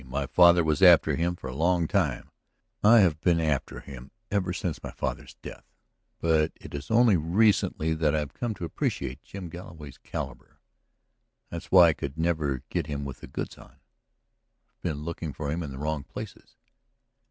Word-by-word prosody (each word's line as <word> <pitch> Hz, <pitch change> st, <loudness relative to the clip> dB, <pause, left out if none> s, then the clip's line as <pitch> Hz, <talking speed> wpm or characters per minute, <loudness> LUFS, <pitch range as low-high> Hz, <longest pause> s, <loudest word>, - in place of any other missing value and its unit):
My 70 Hz, +3 st, -2 dB
father 85 Hz, +3 st, +6 dB
was 80 Hz, -2 st, 0 dB
after 90 Hz, -4 st, +7 dB
him 85 Hz, +1 st, 0 dB
for 85 Hz, -, -12 dB
a 65 Hz, -, -6 dB
long 85 Hz, +2 st, +2 dB
time; 75 Hz, -10 st, -1 dB, 0.5 s
I 110 Hz, +2 st, +7 dB
have 80 Hz, -5 st, +2 dB
been 85 Hz, -2 st, +3 dB
after 75 Hz, -4 st, -1 dB
him 65 Hz, -2 st, -11 dB, 0.2 s
ever 100 Hz, -3 st, 0 dB
since 90 Hz, -3 st, -3 dB
my -, -, -6 dB
father's -, -, -5 dB
death. -, -, -9 dB, 0.6 s
But 80 Hz, -1 st, +2 dB
it -, -, -13 dB
is 70 Hz, 0 st, -6 dB
only 115 Hz, -3 st, +5 dB
recently 85 Hz, -2 st, +2 dB
that 80 Hz, -2 st, +1 dB
I -, -, +2 dB
have 75 Hz, -3 st, -3 dB
come 120 Hz, -3 st, -3 dB
to 90 Hz, -, -5 dB
appreciate 65 Hz, -4 st, -3 dB
Jim 95 Hz, +6 st, -8 dB
Galloway's 80 Hz, -5 st, -10 dB
caliber. -, -, -7 dB, 0.9 s
That's 85 Hz, -, -7 dB
why 90 Hz, -3 st, +8 dB
I -, -, +2 dB
could 70 Hz, -1 st, -6 dB
never 80 Hz, -6 st, -1 dB
get -, -, -2 dB
him 70 Hz, -2 st, -4 dB
with 70 Hz, -2 st, -7 dB
the -, -, -10 dB
goods -, -, -6 dB
on; -, -, -13 dB
I -, -, -42 dB
have -, -, -50 dB
been 75 Hz, -4 st, -3 dB
looking 80 Hz, -2 st, -5 dB
for 70 Hz, +1 st, -4 dB
him 85 Hz, +3 st, -2 dB
in 75 Hz, -, -5 dB
the 65 Hz, -, -8 dB
wrong 75 Hz, 0 st, -2 dB
places. 70 Hz, -, -10 dB
80 Hz, 185 wpm, -27 LUFS, 70-90 Hz, 0.9 s, why